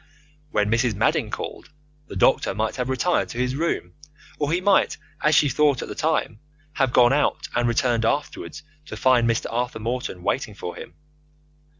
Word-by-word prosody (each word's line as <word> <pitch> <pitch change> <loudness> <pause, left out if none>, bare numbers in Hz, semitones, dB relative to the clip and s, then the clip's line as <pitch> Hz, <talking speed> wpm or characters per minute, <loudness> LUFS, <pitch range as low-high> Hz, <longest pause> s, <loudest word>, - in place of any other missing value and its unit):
When 105 -5 0
Mrs. 115 -1 +1
Madding - - +1
called, - - -6 0.4
the - - -9
doctor 95 - +2
might 110 +4 -2
have 125 0 -2
retired 155 +7 +1
to - - -7
his 125 +1 0
room, 165 +4 -2 0.5
or 145 0 0
he 175 - +2
might, 195 +1 +3 0.2
as 150 +1 +3
she 150 - +5
thought 140 0 +2
at - - -7
the - - -4
time, 155 -8 -1 0.3
have 135 -5 +1
gone 120 +1 +5
out 145 - 0
and 120 0 +1
returned 120 0 +1
afterwards 145 +4 -2 0.2
to - - -7
find 125 -3 +3
Mr. 115 - 0
Arthur 120 +1 -2
Morton 115 -5 -4
waiting 110 -3 -2
for 90 - -6
him. - - -10
125 Hz, 180 wpm, -23 LUFS, 115-145 Hz, 0.5 s, she